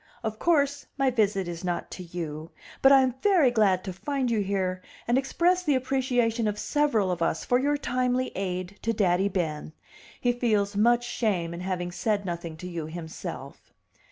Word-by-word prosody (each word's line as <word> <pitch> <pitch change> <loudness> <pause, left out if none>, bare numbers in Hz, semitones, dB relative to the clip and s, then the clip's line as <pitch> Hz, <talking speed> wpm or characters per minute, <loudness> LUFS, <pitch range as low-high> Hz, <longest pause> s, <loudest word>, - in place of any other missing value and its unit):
"Of 220 -1 -3
course 285 -4 +1
my 270 -2 +2
visit 205 -5 +1
is 170 +1 -6
not 175 -1 -3
to - - -7
you; 165 -3 -6 0.3
but 270 - +7
I 270 -1 +7
am 255 -1 +1
very 360 -11 +4
glad 200 -5 +3
to 190 - -5
find 265 +5 -2
you 225 - +2
here 190 -2 -1 0.3
and 240 - +3
express 345 +7 +2
the 300 -6 +2
appreciation 250 -3 +1
of 210 0 -1
several 230 -9 +1
of 175 -1 -3
us 165 -1 0
for 245 - +3
your 290 +2 +1
timely 255 -1 0
aid 185 0 -4
to 230 - 0
Daddy 195 -2 +2
Ben. 160 -5 -3 0.5
He 245 - +2
feels 215 -5 0
much 240 +3 +4
shame 190 -9 -1
in 170 - -6
having 180 -1 -3
said 205 +2 -1
nothing 170 -2 -5
to 180 - -7
you 170 -3 -5
himself." 160 0 -8
210 Hz, 185 wpm, -27 LUFS, 180-255 Hz, 0.5 s, but